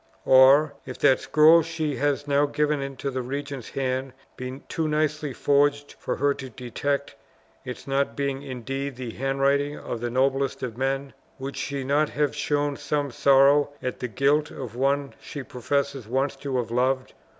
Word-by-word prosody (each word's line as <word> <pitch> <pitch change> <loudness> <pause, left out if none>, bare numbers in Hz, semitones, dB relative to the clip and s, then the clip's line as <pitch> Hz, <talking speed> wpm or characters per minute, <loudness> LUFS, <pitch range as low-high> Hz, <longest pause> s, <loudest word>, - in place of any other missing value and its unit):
Or, 135 +3 +6
if 130 - -8
that 130 - +4
scroll 155 +2 +6
she 160 -3 -3
has 145 0 0
now 145 +1 +3
given 150 0 0
into 135 0 -4
the 130 0 -2
regent's 140 0 -5
hand 130 -1 -2 0.2
be 130 +1 -6
too 160 -1 -2
nicely 155 -1 0
forged 145 +2 +2
for - - -2
her 140 +1 +2
to 135 -1 -8
detect 140 +4 -3 0.5
its 125 - -7
not 140 0 0
being 140 -1 -2
indeed 135 +1 -5
the 125 -2 -6
handwriting 140 +3 0
of 115 - -6
the 120 - -2
noblest 135 +2 0
of 120 -4 -4
men, 135 +2 -2 0.2
would 135 +1 -6
she 140 -1 -3
not 145 +3 +2
have 150 -1 -1
shown 145 -1 0
some 145 -1 -2
sorrow 140 +3 +5
at 125 - -4
the 125 - -2
guilt 140 +6 +2
of 120 -4 -8
one 140 +2 0
she 145 - -7
professes 135 0 -2
once 135 +4 0
to 135 -2 -3
have 120 -2 -2
loved? 130 +2 0
140 Hz, 170 wpm, -25 LUFS, 130-145 Hz, 0.5 s, Or